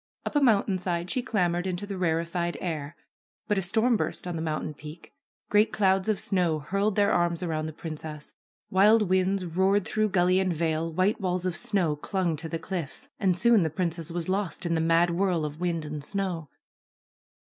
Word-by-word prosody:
Up - - -4
a - - +5
mountainside 185 -7 +1
she 255 - +1
clambered 180 -7 0
into 185 +2 -3
the 200 -1 -5
rarefied 170 0 -1
air. 155 -3 -4 0.5
But 205 -2 +1
a - - -1
storm 220 +6 +2
burst - - -2
on 175 -1 -3
the 160 - -3
mountain 155 -1 -3
peak. 150 +3 -11 0.4
Great 210 +1 +4
clouds 190 0 +2
of 215 - +1
snow 175 -5 +1
hurled 195 +7 -1
their 205 -1 +3
arms 175 0 +1
around 155 -2 -2
the - - -5
princess. 155 -1 -7 0.4
Wild 210 +4 +5
winds 185 0 +2
roared 190 +4 +2
through 215 0 0
gully 185 0 +3
and 185 -3 0
vale, 160 0 -1
white 185 +6 +1
walls 180 -1 -1
of 180 -2 -1
snow 175 -3 0
clung 175 +2 -1
to 160 +2 -6
the 165 - -2
cliffs. 165 -2 -6
And 185 -4 +2
soon 235 +2 +5
the 160 - +1
princess 165 0 -2
was 170 -1 -4
lost 190 -1 -2
in 170 - 0
the 160 - +1
mad 165 +1 +3
whirl 175 -3 +1
of 150 +1 -6
wind 170 -3 -1
and 150 -1 -5
snow. 180 -4 -3
175 Hz, 195 wpm, -27 LUFS, 165-195 Hz, 0.5 s, a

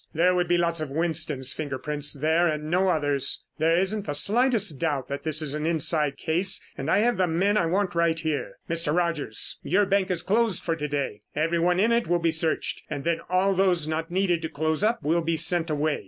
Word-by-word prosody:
There 180 +3 +3
would 180 -1 0
be 175 0 +2
lots 170 -1 0
of 155 - -4
Winston's 155 -3 -1
finger 145 -4 -4
prints 150 +1 -2
there 160 +4 +1
and 155 -1 -3
no 185 +2 +2
others. 145 -5 0 0.2
There 165 +2 +3
isn't 195 +2 -1
the 145 - -2
slightest 215 - +2
doubt 145 -6 -2
that 140 0 -4
this 155 0 0
is 145 -2 -1
an 150 +1 -2
inside 155 -2 +1
case 175 +4 +1 0.2
and 135 - -5
I 190 - +3
have 240 +1 +1
the 185 -1 +2
men 190 +5 +1
I 170 -6 +2
want 190 +2 0
right 170 -1 +1
here. 155 -2 -3
Mr. 165 -2 -1
Rogers, 165 -10 -1
your 200 +3 +2
bank 195 0 +1
is 175 -2 -1
closed 220 -1 +1
for 165 - -1
to 150 -2 -4
day. 140 -7 -3
Everyone 170 +3 +1
in 225 +4 +3
it 235 -4 +1
will 175 +1 +2
be 165 -1 0
searched 160 0 -1
and 145 -2 -5
then 170 0 0
all 185 +2 +2
those 180 -4 +2
not 160 +1 -3
needed 180 -2 0
to 160 - -4
close 155 +4 -1
up 220 -5 +1
will 165 +4 +1
be 165 0 -1
sent 170 +1 +2
away. 150 0 0
165 Hz, 225 wpm, -25 LUFS, 155-180 Hz, 0.2 s, There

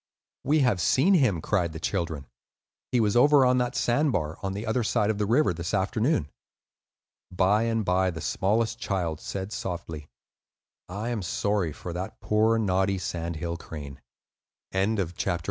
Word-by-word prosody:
"We 150 +2 +3
have 120 -9 +2
seen 140 - +4
him," 125 - +3
cried 85 -5 0
the 80 - -6
children. 80 -5 -2 0.7
"He 125 - +2
was 105 -1 +2
over 145 +2 +6
on 125 0 +3
that 125 0 -1
sand 145 +5 +2
bar, 80 -6 -2
on 95 -1 -3
the 105 +3 -5
other 115 +2 0
side 105 0 +1
of 105 - -5
the 105 - 0
river, 120 -2 +3
this 85 +4 -3
afternoon." 110 - 0 1.0
By 95 +5 +2
and 115 -2 0
by 95 +1 +2
the 85 -2 -5
smallest 110 +8 0
child 90 -7 -2
said, 95 +4 -5
softly, 80 -7 -5 0.8
"I 105 +6 -4
am 120 -4 -2
sorry 95 0 -1
for 85 +4 -7
that 90 +2 -6
poor, 110 +2 +2
naughty, 95 -2 +1
sandhill 85 -1 -4
crane." 70 -4 -9 0.7
XII. 95 +1 +2
THE 100 - +1
MIST 85 +1 -5
LADY. 85 - +1
100 Hz, 170 wpm, -27 LUFS, 85-115 Hz, 1.0 s, over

